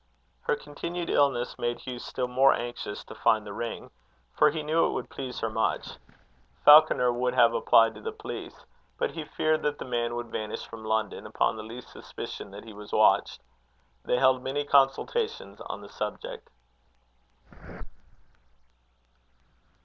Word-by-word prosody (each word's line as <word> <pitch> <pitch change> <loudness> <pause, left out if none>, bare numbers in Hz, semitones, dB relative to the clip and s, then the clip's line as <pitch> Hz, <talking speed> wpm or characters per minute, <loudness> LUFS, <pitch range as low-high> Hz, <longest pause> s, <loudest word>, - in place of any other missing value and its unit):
Her - - +3
continued 170 +4 -5
illness 135 -4 +1
made 120 0 -2
Hugh 125 -1 -6
still 125 +1 -3
more 130 +2 +5
anxious 120 -4 -5
to - - -11
find 110 -1 +2
the 100 - -7
ring, 115 +2 -5 0.4
for - - +5
he 155 +1 -4
knew 160 +2 +2
it - - -3
would - - -5
please 130 -2 -6
her 115 - 0
much. 110 +1 -1 0.7
Falconer 150 -5 +7
would 125 +1 -1
have 115 -2 +5
applied 115 0 +4
to - - -12
the 450 - -4
police, 435 0 -8 0.3
but - - -1
he 160 - -5
feared 155 +1 0
that 145 0 -1
the - - -7
man 120 -2 -1
would 120 -1 -5
vanish 105 -1 -4
from 115 -1 -10
London, 110 -1 -2
upon - - +1
the 110 - -6
least 115 +3 -9
suspicion - - -8
that 100 +1 -10
he 110 - -10
was 105 0 -11
watched. - - +3 0.6
They 125 - +1
held 130 0 +4
many 135 +3 -2
consultations 145 - +1
on 100 - -6
the 100 - -11
subject. 105 -1 -6
125 Hz, 155 wpm, -28 LUFS, 115-145 Hz, 0.7 s, Falconer